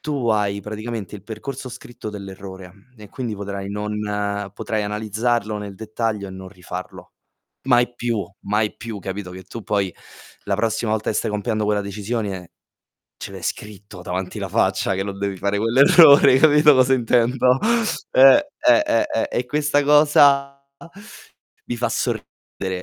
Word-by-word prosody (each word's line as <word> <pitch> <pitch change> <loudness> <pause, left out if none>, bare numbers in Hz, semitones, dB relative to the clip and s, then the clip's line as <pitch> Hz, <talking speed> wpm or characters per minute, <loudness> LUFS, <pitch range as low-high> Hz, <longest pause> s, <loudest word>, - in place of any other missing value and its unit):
tu 140 -6 -2
hai 100 -2 +1
praticamente 110 0 -6
il 95 - -15
percorso 125 +4 -7
scritto 120 -3 -9
dell'errore 95 -2 -9 0.2
e 105 -2 -13
quindi 125 -6 -4
potrai 100 -1 -6
non 105 +1 -4 0.6
potrai 110 -1 -3
analizzarlo 110 +1 -1
nel 100 -1 -7
dettaglio 110 -1 -3
e - - -9
non 95 0 -9
rifarlo. 90 -1 -9 0.5
Mai 120 -2 +2
più, 120 -2 -2 0.2
mai 105 +1 -1
più, 115 -3 -7
capito, 95 0 -6
che 95 0 -10
tu 115 +3 -9
poi 100 -4 -1 0.5
la 100 - -1
prossima 110 0 -1
volta 110 0 -2
che - - -2
stai - - -1
compiendo 105 +1 -2
quella 105 0 +1
decisione 100 -2 -4 0.7
ce - - -8
l'hai - - -9
scritto 100 -2 -6
davanti 90 0 -4
la - - -4
faccia 95 - +1
che 95 - -2
non 100 -1 -6
devi 100 -1 -3
fare 100 +2 -1
quell'errore, 140 - +6
hai 130 - +5
capito 150 -1 +6
cosa 130 0 +4
intendo? 125 +1 +2 0.5
Eh, 135 - +7 0.2
eh, 310 - +6 0.3
eh, - - 0
e 125 - -1
questa 145 +1 +1
cosa 140 -2 +4 1.0
mi 120 - -4
fa 120 - -1
sorridere 95 -2 -4
110 Hz, 150 wpm, -21 LUFS, 100-125 Hz, 1.0 s, Eh